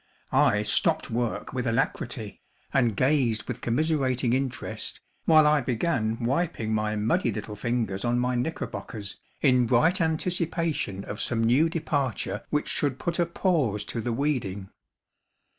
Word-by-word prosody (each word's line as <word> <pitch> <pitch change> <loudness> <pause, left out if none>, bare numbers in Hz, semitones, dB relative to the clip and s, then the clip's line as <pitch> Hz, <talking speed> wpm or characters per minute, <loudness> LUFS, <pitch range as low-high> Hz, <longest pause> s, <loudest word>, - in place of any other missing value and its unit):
I - - +4
stopped - - +1
work 120 +2 -2
with 125 -1 -2
alacrity, 115 0 -2 0.3
and 120 -6 +3
gazed 130 -6 +2
with - - -6
commiserating 130 -2 +1
interest, 130 -1 -3 0.3
while 155 -1 +6
I 150 -1 +4
began 120 -3 0
wiping 130 -5 0
my 110 0 0
muddy 115 - +1
little 105 0 -5
fingers 110 -3 -2
on 120 0 +1
my 125 +1 +1
knickerbockers 120 -6 -4 0.2
in 125 -4 +4
bright 160 - +3
anticipation 160 - -1
of 105 - -6
some 115 -1 0
new 130 +8 +4
departure 140 -9 -2
which 150 - 0
should 140 -3 0
put 170 +4 -2
a 170 - +3
pause 145 - 0
to 115 - -4
the 120 - -2
weeding. 115 -8 -1
125 Hz, 140 wpm, -27 LUFS, 115-155 Hz, 0.3 s, while